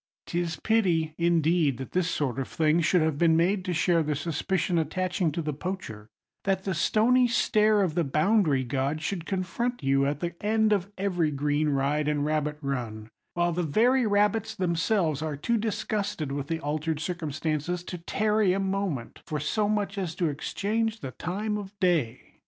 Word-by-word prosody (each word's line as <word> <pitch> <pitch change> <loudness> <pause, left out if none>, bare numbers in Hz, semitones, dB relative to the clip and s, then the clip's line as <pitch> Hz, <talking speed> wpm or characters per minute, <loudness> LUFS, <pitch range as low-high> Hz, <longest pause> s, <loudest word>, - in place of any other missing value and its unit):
'Tis 170 -1 -2
pity, 170 -5 +1
indeed, 165 -4 +2
that 130 - -7
this 180 -2 +1
sort 135 -3 -1
of 135 - -2
thing 160 +1 +2
should 170 +1 +3
have 155 -2 0
been 165 -2 +4
made 185 +3 +2
to 180 - -3
share 175 0 +2
the 150 -1 -1
suspicion 170 +3 -1
attaching 180 +1 -1
to 165 +3 -3
the 150 0 -2
poacher; 140 - -6 0.4
that 195 -1 0
the 195 - -1
stony 235 +9 +3
stare 215 -3 +3
of 175 -5 0
the 170 +1 +1
boundary 155 -1 +2
god 135 +4 -1
should 170 +1 -4
confront 195 - -2
you 135 0 +3
at 145 0 -2
the 175 +1 -3
end 215 0 +3
of 200 0 -1
every 180 -5 0
green 145 +1 0
ride 145 +2 0
and 145 -1 0
rabbit 150 -1 -1
run; 120 -6 -4 0.3
while 175 0 +2
the 175 +2 -1
very 230 - +3
rabbits 210 +1 +1
themselves 170 -4 0
are 155 -2 -3
too 235 +11 0
disgusted 205 -7 -2
with 140 0 -3
the 165 0 -2
altered 155 +1 -2
circumstances 160 0 -2
to 180 -1 -6
tarry 210 +2 +1
a 195 - 0
moment 190 -10 -2
for 150 - -2
so 205 +8 0
much 205 -1 -1
as 175 -4 -3
to 170 -3 0
exchange 220 +9 -2
the 130 - -5
time 210 +7 -3
of 200 0 -10
day. 160 - 0
170 Hz, 180 wpm, -27 LUFS, 150-200 Hz, 0.4 s, been